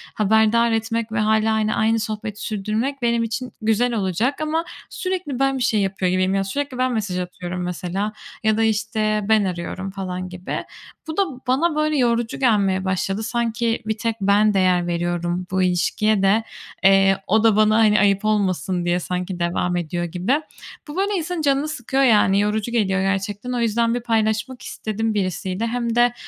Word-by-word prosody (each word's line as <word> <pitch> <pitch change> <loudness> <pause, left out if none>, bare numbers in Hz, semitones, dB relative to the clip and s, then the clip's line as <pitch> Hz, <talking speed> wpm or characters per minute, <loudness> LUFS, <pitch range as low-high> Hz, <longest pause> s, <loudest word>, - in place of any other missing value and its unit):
haberdar 220 +2 +3
etmek 225 0 -1
ve 220 - -1
hâlâ, 220 +1 +2
hani, 215 0 +1
aynı 225 0 +2
sohbeti 215 -1 -5
sürdürmek 220 +6 -2
benim 235 -1 +1
için 235 +3 -4
güzel 225 +3 +1
olacak 215 - -1
ama 315 +2 -1 0.2
sürekli 365 -8 -3
ben 270 0 +2
bir 255 - -1
şey 225 -3 +2
yapıyor 190 -2 0
gibiyim. 185 +1 +1
Yani 195 0 0
sürekli 275 +5 -3
ben 255 0 +1
mesaj 200 -5 -2
atıyorum 180 0 -5
mesela 180 +4 -3 0.3
ya 220 0 +2
da, 225 - +2
işte, 215 -1 0
ben 220 -1 +4
arıyorum 185 +2 -4
falan 185 -1 -5
gibi. 180 0 -5 0.4
Bu 315 +2 -5
da 395 - +4 0.2
bana, 300 +6 +2
böyle, 305 0 +1
yorucu 235 -2 0
gelmeye 200 -7 +2
başladı. 195 +3 -1
Sanki 230 0 -1
bir 220 0 -2
tek 225 +1 -1
ben 205 +2 +4
değer 185 -2 +2
veriyorum 175 +1 -2
bu 190 0 +1
ilişkiye 195 +4 +1
de, 210 +4 +3 0.4
eee, 195 0 +5
o 220 +3 +3
da 225 -2 +5
bana, 215 0 +4
hani, 215 -2 +4
ayıp 200 0 +2
olmasın 190 -4 0
diye 175 0 +1
sanki 180 0 -4
devam 175 +1 0
ediyor 175 0 -3
gibi. 185 - 0 0.5
Bu, 295 - -8
böyle, 395 +2 +1
insanın 350 -1 -2
canını 280 0 +1
sıkıyor 270 -2 -1
yani 210 -5 +4
yorucu 210 +2 0
geliyor 195 -5 +1
gerçekten. 200 +4 -2
O 245 - -1
yüzden 230 0 +1
bir 245 - 0
paylaşmak 225 +2 0
istedim 220 +1 -3
birisiyle. 190 +2 -2
Hem 235 0 -2
de 240 0 +4
215 Hz, 175 wpm, -21 LUFS, 190-235 Hz, 0.5 s, eee